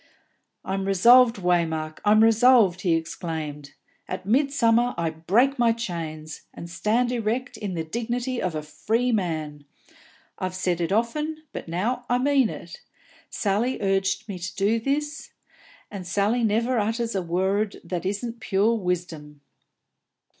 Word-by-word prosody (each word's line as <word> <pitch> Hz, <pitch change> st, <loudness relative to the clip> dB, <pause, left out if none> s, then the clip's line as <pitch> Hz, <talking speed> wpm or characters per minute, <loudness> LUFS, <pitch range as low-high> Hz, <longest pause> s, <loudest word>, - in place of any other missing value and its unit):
"I'm 190 Hz, 0 st, -2 dB
resolved, 235 Hz, +5 st, +6 dB
Waymark, 165 Hz, -4 st, -1 dB
I'm 215 Hz, +1 st, +5 dB
resolved!" 225 Hz, -5 st, +5 dB
he 170 Hz, -4 st, +2 dB
exclaimed. 160 Hz, -3 st, -5 dB, 0.3 s
"At -, -, -5 dB
midsummer 245 Hz, -1 st, +2 dB
I 165 Hz, -1 st, -1 dB
break 225 Hz, -, +1 dB
my 235 Hz, -1 st, +4 dB
chains, 165 Hz, -8 st, -6 dB
and 170 Hz, -, -8 dB
stand 220 Hz, +8 st, 0 dB
erect 240 Hz, +2 st, -2 dB
in 200 Hz, -4 st, -5 dB
the 165 Hz, -, -2 dB
dignity 240 Hz, +7 st, -3 dB
of 180 Hz, -3 st, -2 dB
a 155 Hz, -, -3 dB
free 225 Hz, +10 st, -1 dB
man. 155 Hz, -8 st, -2 dB, 0.8 s
I've 185 Hz, 0 st, -3 dB
said 180 Hz, -2 st, -1 dB
it 170 Hz, -, -1 dB
often, 300 Hz, +9 st, -1 dB
but -, -, -6 dB
now 235 Hz, +9 st, -2 dB
I 245 Hz, -, +3 dB
mean 270 Hz, -2 st, +3 dB
it. 170 Hz, -, -9 dB, 0.5 s
Sally 215 Hz, +5 st, -1 dB
urges 195 Hz, +2 st, 0 dB
me 195 Hz, -4 st, -6 dB
to 175 Hz, +2 st, -6 dB
do 215 Hz, +3 st, +1 dB, 0.2 s
ut, 300 Hz, +1 st, -6 dB, 0.6 s
and 190 Hz, -4 st, -7 dB
Sally 205 Hz, +6 st, +1 dB
never 230 Hz, +3 st, +1 dB
utters 225 Hz, +2 st, -1 dB
a 195 Hz, -, 0 dB
worrud 190 Hz, +4 st, -1 dB
that 175 Hz, 0 st, -4 dB
isn't 230 Hz, +5 st, -3 dB
pure 215 Hz, +1 st, +2 dB
wisdom." 175 Hz, -7 st, -4 dB
200 Hz, 140 wpm, -25 LUFS, 175-235 Hz, 0.8 s, resolved